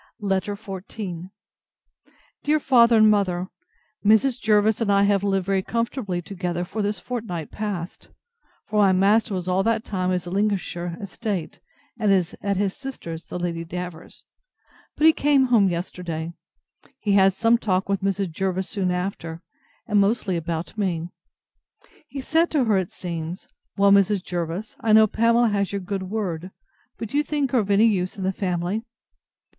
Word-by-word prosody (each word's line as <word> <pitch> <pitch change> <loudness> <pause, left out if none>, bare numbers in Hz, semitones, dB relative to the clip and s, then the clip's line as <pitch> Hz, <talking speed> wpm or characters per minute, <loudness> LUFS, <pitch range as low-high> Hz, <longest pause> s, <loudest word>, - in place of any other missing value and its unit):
LETTER 200 0 -1
XIV 190 -3 -7 1.1
DEAR 305 +1 +2
FATHER 235 -4 +5
AND 215 0 +6
MOTHER, 185 -3 0 0.5
Mrs. 220 +5 +4
Jervis 215 +1 +3
and 210 -3 +2
I 200 0 +4
have 200 -1 +3
lived 195 -2 +1
very 195 0 +1
comfortably 230 -4 -2
together 175 -2 -3
for 215 +4 -4
this 205 +1 -1
fortnight 215 -10 -5
past; 195 -5 -5 0.6
for 210 0 -1
my 195 -2 +5
master 200 +3 +3
was 180 -1 -4
all 185 +1 +2
that 225 +2 +1
time 185 -5 -2
at - - +1
his 180 -1 -2
Lincolnshire 180 -3 -2
estate, 200 -4 -4 0.4
and 210 -3 +2 0.3
at 200 -1 -1
his 195 -1 0
sister's, 215 - -7
the - - -5
Lady 170 -1 -3
Davers. 180 0 -8 0.7
But 305 - +2
he 320 - +8
came 285 -3 +3
home 225 -6 +4
yesterday. 170 -2 -4 0.6
He 205 - -2
had 195 -1 +5
some 230 +1 +3
talk 190 -4 0
with 200 0 0
Mrs. 195 -2 -1
Jervis 190 +2 -2
soon 195 -4 -1
after, 180 -2 -4 0.4
and 210 -2 +3
mostly 200 -2 +1
about 170 +4 -4
me. 175 -4 -1 1.0
He 275 - -6
said 325 +5 +2
to 295 -4 +2
her, 220 -3 +2
it 185 - -4
seems, 170 0 -6 0.3
Well, 200 0 +5
Mrs. 200 -1 +4
Jervis, 175 +4 -4
I 220 -1 +2
know 220 0 +8
Pamela 230 +2 +3
has 200 -2 0
your 200 -1 -3
good 190 0 -4
word; 185 -5 -3 0.5
but 225 - -5
do 285 - -1
you 295 - +3
think 290 -4 -1
her 255 - +3
of 205 -2 -2
any 205 +2 +5
use 190 -3 0
in 195 - -4
the 190 +1 0
family? 180 +2 -2
200 Hz, 165 wpm, -24 LUFS, 180-220 Hz, 1.1 s, he